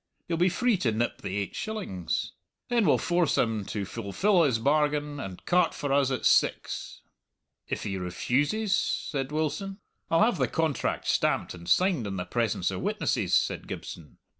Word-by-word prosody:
You'll 165 -1 -1
be 180 +2 +4
free 240 +3 +2
to 125 -10 +1
nip 115 +2 -1
the 95 +1 -3
eight 100 -1 -3
shillings. 140 - -3 0.4
Then 235 -4 +3
we'll - - +5
force 175 -2 +1
him 110 -3 +1
to 100 0 -3
fulfill 115 - +1
his 135 -8 +3
bargain 145 +2 +1
and 95 -8 -7
cart 180 0 +3
for 145 -1 -2
us 140 -2 +3
at 130 - -2
six." - - +1 0.7
"If - - -3
he 95 -2 -3
refuses?" 145 - 0
said 135 -1 -2
Wilson. 160 +6 -2 0.3
"I'll 165 +5 +4
have 220 -7 +2
the 130 - +2
contract 160 +2 -1
stamped - - +1
and 85 -1 -9
signed 175 - +3
in 95 - -4
the 90 -1 -3
presence 115 -4 0
of 95 - -4
witnesses," - - 0
said - - 0
Gibson. 80 -3 -8
140 Hz, 170 wpm, -28 LUFS, -, 0.7 s, we'll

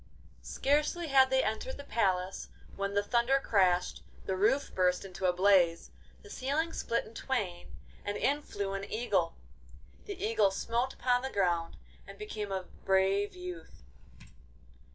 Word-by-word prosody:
Scarcely 300 +4 0
had 265 -1 +6
they 265 0 +3
entered 220 +4 -3
the 285 - -8
palace 190 -7 -1 0.3
when 200 0 -3
the 205 - +2
thunder 240 +5 +2
crashed, 185 -7 +2 0.2
the 190 - -1
roof 220 +9 +1
burst 180 0 +1
into 185 0 -2
a - - +4
blaze, 180 -2 +3 0.3
the 415 - -13
ceiling 310 +5 -1
split 235 - -1
in 225 - -14
twain, 205 -9 -3 0.3
and 205 0 -3
in 290 +2 +1
flew 200 -7 -4
an 195 +1 -5
eagle. 200 -7 0 0.7
The 405 -3 -7
Eagle 220 -2 +3
smote 235 +6 -2
upon 245 0 +1
the 265 - -3
ground 175 -6 0 0.3
and - - -11
became 215 - -5
a 190 -1 -2 0.2
brave 195 +1 +2
youth. 180 - -9
205 Hz, 150 wpm, -31 LUFS, 190-260 Hz, 0.7 s, had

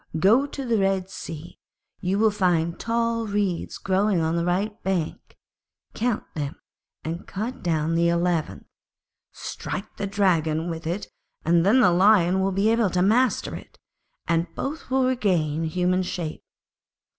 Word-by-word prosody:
Go 225 - +4
to 275 -1 -6
the 230 -3 +1
Red 195 -1 0
Sea, 165 -2 -8 0.4
you 185 +2 0
will 220 +1 +4
find 175 -4 +1
tall 230 0 0
reeds 200 -4 -1
growing 195 0 +1
on 160 0 0
the 170 - 0
right 195 +5 -1
bank; 185 -5 -3 0.6
count 235 -1 -1
them, 145 -3 -4 0.5
and 165 +3 -5
cut 220 +6 -4
down 160 -2 0
the 170 0 +3
eleventh, 170 -2 0 0.7
strike 195 - -6
the 200 - -2
Dragon 170 -5 +1
with 165 0 -6
it 180 +5 -2 0.4
and 170 +1 +4
then 220 +8 +5
the 180 - +5
Lion 185 0 +4
will 195 +1 +1
be 200 +3 +2
able 230 -3 +2
to 180 0 +1
master 240 +6 +2
it, - - -11 0.5
and 165 +1 +1
both 300 +2 -5
will 260 0 +2
regain 175 -11 +1
human 180 +3 +1
shape. 175 -3 -4
185 Hz, 150 wpm, -24 LUFS, 170-215 Hz, 0.7 s, then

